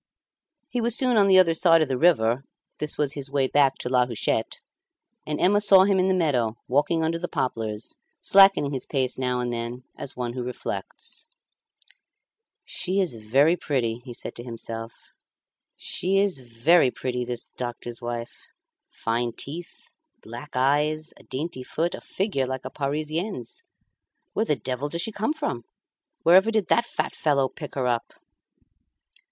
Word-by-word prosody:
He 245 - -2
was 235 0 +2
soon 255 -2 +2
on 205 -2 +5
the 190 -1 +6
other 175 -3 +6
side 165 -1 +5
of - - -2
the 130 - -1
river 125 -5 +3 0.4
(this 150 0 0
was 145 -1 +1
his 140 -2 -4
way 140 -1 +1
back 135 0 +3
to - - -5
La 125 -1 +3
Huchette), 115 -1 -1 0.7
and 150 0 -2
Emma 205 +3 +4
saw 195 -2 +7
him 195 -1 +3
in 185 - +3
the 190 - +3
meadow, 125 -10 +1
walking 150 +5 +2
under 165 +1 0
the 175 - -3
poplars, 110 -6 -3 0.2
slackening 195 -7 +5
his 130 - -4
pace 130 -3 0
now 125 -1 0
and 120 -1 -2
then 120 +2 -5
as 135 - -6
one 120 -1 -3
who 125 - -4
reflects. 125 - -6 1.4
"She 190 +2 -2
is 185 -8 +1
very 135 +10 +3
pretty," 120 -9 -1
he 125 - -9
said 120 - -6
to 120 - -5
himself; 115 -1 -6 0.8
"she 190 +2 0
is 195 -7 +2
very 130 +6 +3
pretty, 125 0 -3
this 120 -1 -5
doctor's 120 -1 -6
wife. 120 0 -6 0.4
Fine 115 +1 -2
teeth, 165 +8 -6 0.5
black 120 +6 -9
eyes, 150 +4 +1
a - - -16
dainty 135 0 -4
foot, 165 +6 -2
a - - -6
figure 185 -10 -1
like 130 0 -5
a - - -5
Parisienne's. 155 - -3 0.7
Where - - +1
the - - +2
devil 130 +3 -3
does 170 +2 -1
she 220 - -1
come 215 +7 -1
from? 290 - -3 0.6
Wherever 185 +6 +6
did 215 -5 0
that 235 0 +3
fat - - -2
fellow 140 -3 +2
pick 150 +2 -9
her 130 -2 -1
up?" 120 -1 -1
140 Hz, 165 wpm, -25 LUFS, 125-175 Hz, 1.4 s, saw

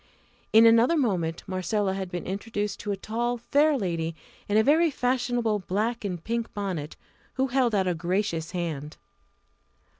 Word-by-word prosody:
In 220 +1 +7
another 230 +8 +5
moment 180 - 0
Marcella 190 +1 -1
had 190 -1 -4
been 175 -1 -5
introduced 205 +1 -3
to 205 - -3
a 200 - -2
tall, 240 +4 -2
fair 285 +5 +2
lady 165 -6 -2 0.3
in 205 - +3
a 220 - +5
very 320 +6 +4
fashionable 245 -5 0
black 215 +6 -2
and 180 -5 -4
pink 230 +1 -2
bonnet, 185 -7 -3 0.4
who 265 0 0
held 245 -3 +2
out 190 -2 +2
a 180 - +2
gracious 170 -1 -1
hand. 160 -5 -4
205 Hz, 155 wpm, -26 LUFS, 180-240 Hz, 0.4 s, In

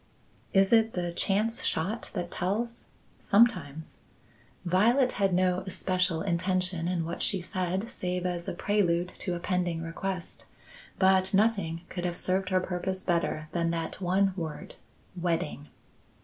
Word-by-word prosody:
Is 195 +1 +4
it 225 0 +5
the 175 -1 -2
chance 210 +6 +1
shot 195 +9 -1
that 175 -2 -3
tells? 225 +6 -2 0.3
Sometimes. 180 - +2 0.7
Violet 235 +9 +4
had 195 -1 +1
no 180 0 +2
especial 185 -2 0
intention 180 -1 0
in 175 -2 0
what 170 - -4
she 195 - +1
said 185 +3 -2
save 180 -5 -3
as 175 -1 -2
a 190 - -2
prelude 180 -2 +1
to 180 -3 -2
a - - -4
pending 175 -2 -1
request, 180 +2 -5 0.5
but 190 0 +4
nothing 195 -6 +2
could 175 - -5
have 175 -1 -2
served 185 0 0
her 185 -1 +3
purpose 185 +1 -3
better 170 -3 0
than 170 -1 0
that 165 +2 -3
one 190 +2 +2
word, 160 -5 -5 0.4
wedding. 165 -4 -2
185 Hz, 140 wpm, -29 LUFS, 170-195 Hz, 0.7 s, it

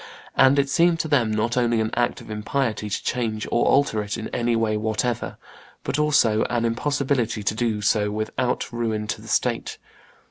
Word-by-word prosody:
And 135 +2 +5
it 140 0 +3
seemed 170 +3 +3
to - - -4
them 135 -7 +2
not 110 +2 0
only 120 -2 +2
an 110 0 -1
act 120 0 0
of - - -11
impiety 110 0 -2
to 100 - -3
change 110 -3 -2
or 120 - +2
alter 135 -6 +3
it 105 0 -4
in 110 - -5
any 120 -1 0
way 110 -1 +1
whatever, 110 +2 -2 0.5
but 145 - -2
also 130 -8 +3
an 120 -1 -1
impossibility 125 -2 0
to 100 - 0
do 110 -2 -1
so 105 0 +2
without 110 +4 -2
ruin 110 -2 -2
to - - -4
the - - -13
state. - - -1
115 Hz, 185 wpm, -23 LUFS, 110-130 Hz, 0.5 s, And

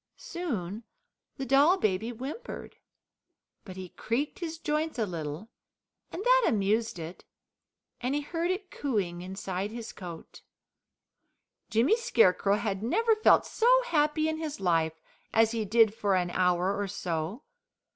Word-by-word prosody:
Soon 225 - -4 0.5
the 270 - -3
doll 285 +8 +5
baby 215 - 0
whimpered, 265 - -7 0.9
but 185 - -9
he 185 -1 -7
creaked 280 - -2
his 330 -2 -4
joints 310 -1 -1
a 225 - +1
little, 165 +3 -6 0.6
and 385 - -5
that - - +5
amused 215 +1 +1
it, 165 +2 -8 0.8
and 255 +3 0
he 295 - 0
heard 335 +3 -2
it 370 0 -3
cooing 195 -11 -2
inside 190 +1 -4
his 230 0 -7
coat. 170 -4 -10 1.3
Jimmy 240 - +4
Scarecrow 215 - +3
had 205 -2 -2
never 445 - +2
felt 435 - +5
so 460 - 0 0.2
happy 310 -6 +1
in 315 0 -1
his 310 -2 -5
life 165 -3 +1 0.3
as 225 0 +4
he 225 -2 -2
did 220 +1 +4
for 205 -3 +1
an 175 -1 0
hour 180 +2 +2
or 205 0 -2
so. 175 - -3
225 Hz, 140 wpm, -29 LUFS, 185-305 Hz, 1.3 s, doll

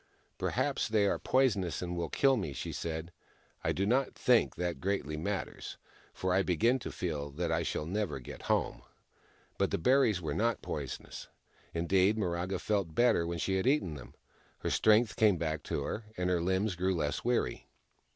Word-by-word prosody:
" - - -39
Perhaps - - 0
they 105 -2 +3
are 100 - +1
poisonous, 105 -10 +1
and 90 -1 -3
will 85 -2 -2
kill 135 -1 +3
me," 75 - -3
she 70 - -5
said. 80 +1 -4 0.3
" - - -35
I - - +1
do 95 - 0
not 125 +5 +1
think 125 -2 +3
that 85 -5 -3
greatly 95 -6 -1
matters, 95 +3 -4 0.3
for 95 -1 -1
I 95 - +4
begin 105 +9 +2
to - - -6
feel 75 -5 -3
that 85 +2 -2
I 80 - +1
shall 75 - -2
never 100 +2 -2
get 60 - -9
home." - - +1 0.8
But - - +2
the - - 0
berries 125 -1 +3
were 80 -4 -3
not 115 +7 0
poisonous. 70 -4 -6 0.5
Indeed, 95 +5 +3
Miraga 90 -1 -1
felt 100 -7 -1
better 120 -9 +3
when 85 0 -2
she 95 +4 0
had 95 - 0
eaten 135 - +2
them. 65 -4 -10 0.5
Her - - -1
strength 110 +1 +4
came 105 -4 +4
back 80 -2 -2
to - - -2
her, 110 - -4
and 90 0 0
her 90 -2 +2
limbs 95 +2 0
grew 95 +1 0
less 75 -3 -1
weary. 120 - 0
95 Hz, 190 wpm, -32 LUFS, 85-110 Hz, 0.8 s, I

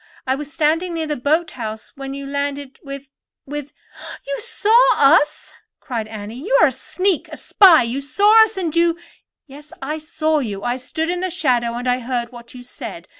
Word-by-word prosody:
I 260 - +1
was 290 +2 -6
standing 325 +2 0
near 325 -1 -2
the 300 -1 -2
boat 310 +6 0
house 220 -3 -7
when 275 0 -6
you 280 0 -7
landed 280 -1 -4
with—with——" 275 +1 -10 0.5
"You 280 0 -3
saw 435 +2 +1 0.2
us?" 295 +1 +3 0.3
cried 230 -6 -4
Annie. 215 +2 -8
"Then 290 - -9
you - - +4
are - - +6
a - - -7
sneak—a 370 -3 -2
spy. 360 -9 +6
You 240 +4 -3
saw 415 +10 +5
us, 440 -1 -2
and 340 -4 -2
you——" 335 0 +3 0.5
"Yes, 295 +1 -14
I 300 +4 -4
saw 310 0 0
you. 205 -7 -4
I 245 +1 -1
stood 320 +6 -3
in 355 - -2
the 370 +1 -2
shadow, 245 -9 0
and 245 +1 -4
I 250 0 +1
heard 245 -1 -3
what 240 0 -13
you 250 - -10
said. 245 - -9
285 Hz, 190 wpm, -20 LUFS, 250-325 Hz, 0.5 s, are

